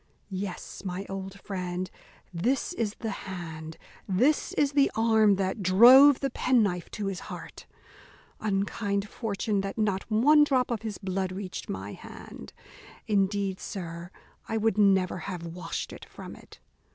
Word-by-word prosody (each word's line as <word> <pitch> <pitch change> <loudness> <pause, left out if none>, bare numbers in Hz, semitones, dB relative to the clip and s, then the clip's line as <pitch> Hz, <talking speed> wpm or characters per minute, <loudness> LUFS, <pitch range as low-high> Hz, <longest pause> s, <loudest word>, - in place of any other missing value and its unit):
Yes, 190 -1 -5
my 190 +1 -4
old 195 0 -6
friend, 185 -2 -4 0.4
this 245 - 0
is 220 -9 -2
the 225 - -4 0.2
hand, 160 -3 -7 0.3
this 250 +11 +2
is 285 -1 +2
the 280 -1 +4
arm 220 -2 +4
that 190 +2 -2
drove 250 +9 +8
the 275 -2 -1
penknife 210 -10 +1
to 210 - -5
his 195 -2 -3
heart. - - -9 0.7
Unkind 200 0 -1
fortune, 205 -1 -2
that 195 0 -5
not 205 -2 0
one 290 +8 +6
drop 260 -4 +1
of 225 -3 -1
his 220 -3 -5
blood 190 0 -2
reached 185 0 -6
my 95 +2 -5
hand. 70 - -11 0.5
Indeed, 200 -1 0
sir, 170 -3 -6 0.4
I 225 - 0
would 220 0 +2
never 190 -3 +3
have 175 -3 -5
washed 170 +2 -5
it - - -10
from - - -10
it. - - -16
200 Hz, 145 wpm, -28 LUFS, 185-225 Hz, 0.7 s, drove